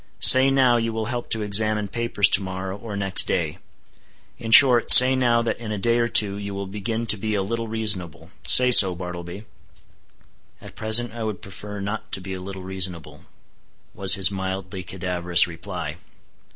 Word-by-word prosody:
Say 130 +1 +7
now 130 -3 +1
you 115 0 -3
will 110 0 -5
help 120 -1 -7
to 110 -1 -2
examine 105 0 +1
papers 115 -2 -1
to 100 - +4
morrow 95 0 -7
or 105 0 -10
next 95 -1 0
day: - - -4 0.8
in 115 - -8
short, 120 +1 +6
say 130 +1 +8
now 120 -2 0
that 115 - -4
in 115 -2 -8
a 105 - -5
day 115 +4 -1
or 120 - -1
two 100 -3 +1
you 100 -1 -8
will 100 0 -6
begin 110 +4 -6
to 110 - +2
be 110 +2 -4
a 100 - -2
little 115 +3 -6
reasonable:—say 110 +3 +1
so, 95 -6 +6
Bartleby." 90 +3 -10 1.1
"At - - -14
present 110 +2 0
I 115 -1 -8
would 110 -3 -6
prefer 105 +2 -10
not 105 +3 -7
to - - -4
be 95 +1 -9
a 95 - -8
little 95 0 -10
reasonable," 95 -3 -5 0.7
was 95 -1 +5
his 95 -1 -1
mildly 95 0 -7
cadaverous 90 -2 -2
reply. 85 -2 -9
100 Hz, 180 wpm, -21 LUFS, 95-115 Hz, 1.1 s, say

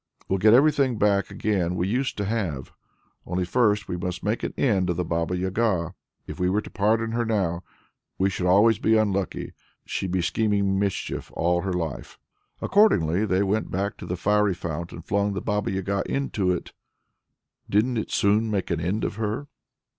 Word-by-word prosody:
We'll 95 - 0
get 110 +4 +6
everything 140 -3 +3
back 100 -1 +2
again 90 -4 -1
we 90 +1 0
used 125 +6 -1
to 100 - -1
have! 95 - -3 0.5
Only 90 +1 -2
first 105 -1 +2
we 90 - -3
must 90 +1 -4
make 105 +2 -1
an - - -3
end 95 -9 +2
of 90 - -1
the 90 - -1
Baba 85 +2 -1
Yaga. 95 -2 0 0.3
If - - -8
we 90 0 +2
were 105 +3 +1
to - - -11
pardon 110 +3 +1
her 120 +1 0
now, 95 -7 0 0.6
we 95 - +2
should 90 -1 -2
always 100 +4 +5
be 110 0 +3
unlucky; 100 -4 -1 0.3
she'd 95 - -3
be 90 -1 0
scheming 100 -1 +1
mischief 100 -1 -2
all 85 +1 +1
her 95 0 -2
life." 80 -6 -4 0.5
Accordingly 105 - +3
they 95 +1 +2
went 105 +3 0
back 100 +3 -2
to - - -9
the 90 - -3
fiery 105 +1 +2
fount, 85 0 -5
and 85 - -10
flung 100 0 0
the 95 - -2
Baba 105 -1 -1
Yaga 95 +1 -1
into 110 -9 -1
it; 90 -1 -2 1.0
didn't 115 +4 +2
it 110 - -2
soon 105 +3 +2
make 100 -4 -2
an 85 - 0
end 95 +6 -1
of - - -3
her! 110 +6 -3
100 Hz, 185 wpm, -25 LUFS, 90-110 Hz, 1.0 s, get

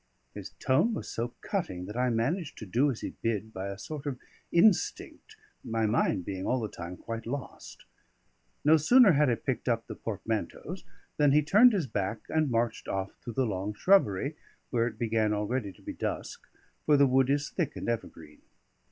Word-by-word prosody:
His - - -7
tone 215 - +2
was - - -5
so 120 +1 -4
cutting 95 - -3
that 105 - -8
I 125 +1 +1
managed 140 +9 -1
to 110 - -7
do 125 +9 +2
as 125 - -4
he - - -4
bid 110 -1 -2
by 95 +1 -4
a 100 0 -5
sort 145 +7 -7
of 135 -3 -2 0.3
instinct, 180 +2 +2 0.3
my 115 0 -1
mind 105 -4 +1
being 95 -1 -4
all 130 - +1
the 110 -2 -3
time 90 +1 -8
quite 115 +3 -6
lost. 140 +3 -7 0.8
No 155 +2 +7
sooner 230 - +6
had 150 -2 +3
I 120 - +2
picked 130 +1 -3
up 115 -1 0
the 110 - -7
portmanteaus 110 - -4 0.3
than 145 -2 +4
he 150 +1 +5
turned 215 - +6
his 185 -7 0
back 105 -2 -3
and 155 -2 +1
marched 115 -1 -1
off 95 0 -2
through 120 - -6
the 130 +3 +1
long 100 -1 -3
shrubbery, 140 - +3 0.4
where 120 -1 +2
it 110 -2 -6
began 110 -2 +1
already 105 +1 -2
to - - -20
be - - -5
dusk, - - -5 0.4
for 150 -1 +6
the 140 - +6
wood 130 0 +3
is 145 +1 0
thick 175 -7 -2
and - - -5
evergreen. 80 -10 -5
120 Hz, 190 wpm, -29 LUFS, 105-145 Hz, 0.8 s, No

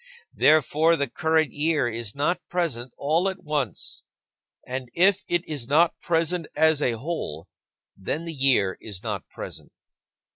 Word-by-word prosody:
Therefore, 155 +2 +4
the 140 -3 -1
current 160 +3 +1
year 150 -3 +1
is 115 -2 -3
not 145 +6 0
present 135 -9 -1
all 165 +7 +1
at 190 0 -8
once. 145 - -2 0.6
And 130 -1 -5
if 190 +2 +4
it 175 0 0
is 145 -7 -4
not 160 +5 +3
present 165 0 0
as 160 0 +4
a 125 - +2
whole, 110 - -5 0.5
then 150 - -3
the 165 - -5
year 130 -9 +2
is 100 -4 -6
not 105 -5 -4
present. - - -9
150 Hz, 145 wpm, -25 LUFS, 120-165 Hz, 0.6 s, Therefore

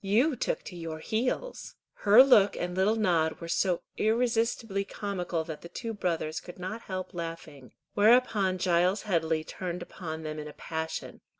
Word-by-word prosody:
"You 240 +10 +3
took - - -2
to 180 - -9
your 165 -2 -5
heels." 250 - -3 0.2
Her 215 +5 +7
look 210 -7 +5
and 180 0 -3
little 195 +4 +3
nod 170 -7 +1
were 170 - -7
so 175 0 +1
irresistibly 225 -2 +1
comical 185 -5 -3
that 160 -1 -7
the 170 - -10
two 230 +5 -5
brothers 165 -6 -2
could 175 - -11
not 190 +5 -5
help 185 -3 -5
laughing; 165 -5 -7 0.2
whereupon 210 -3 +4
Giles 180 +2 +2
Headley 160 -5 0
turned 180 +2 -5
upon 160 -3 -7
them 155 0 -4
in 150 - -6
a 150 - -9
passion. 160 +1 -5
185 Hz, 165 wpm, -29 LUFS, 165-215 Hz, 0.2 s, Her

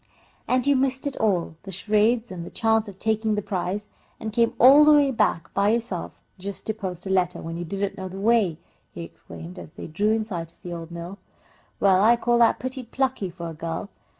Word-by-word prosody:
"And 255 -1 +1
you 285 0 +4
missed 265 0 0
it 285 - -2
all 180 -7 0
the 195 - -9
charades 215 +4 +1
and 175 -2 -6
the - - -8
chance 225 -1 +1
of 195 -2 -10
taking 220 0 0
the 210 - -1
prize 195 +2 -3 0.3
and 220 -1 -5
came 235 +1 +2
all 270 +5 +8
the 300 0 +7
way 285 -2 +5
back 210 -8 0
by 200 +1 +2
yourself 225 -6 -1 0.3
just 200 +1 -7
to 220 - -1
post 185 -4 -6
a 190 - -3
letter, 180 -2 +1
when 165 0 -6
you 175 - -4
didn't 195 +3 -3
know 190 - -4
the 190 +1 -8
way!" 210 -6 +2 0.4
he 170 - -5
exclaimed 170 +2 -10
again - - -8
as 155 - -20
they - - -8
drew 200 +7 0
in 220 -1 0
sight 170 -5 -6
of - - -36
the 175 - -6
old 165 -1 -7
mill. 170 +3 -8 0.6
"Well, 190 -1 +4
I 230 +3 +6
call 240 0 +1
that 235 - +5
pretty 260 +1 -5
plucky 255 -4 -2
for 170 -1 -7
a - - -7
girl." 165 +5 -5
205 Hz, 230 wpm, -24 LUFS, 180-230 Hz, 0.6 s, all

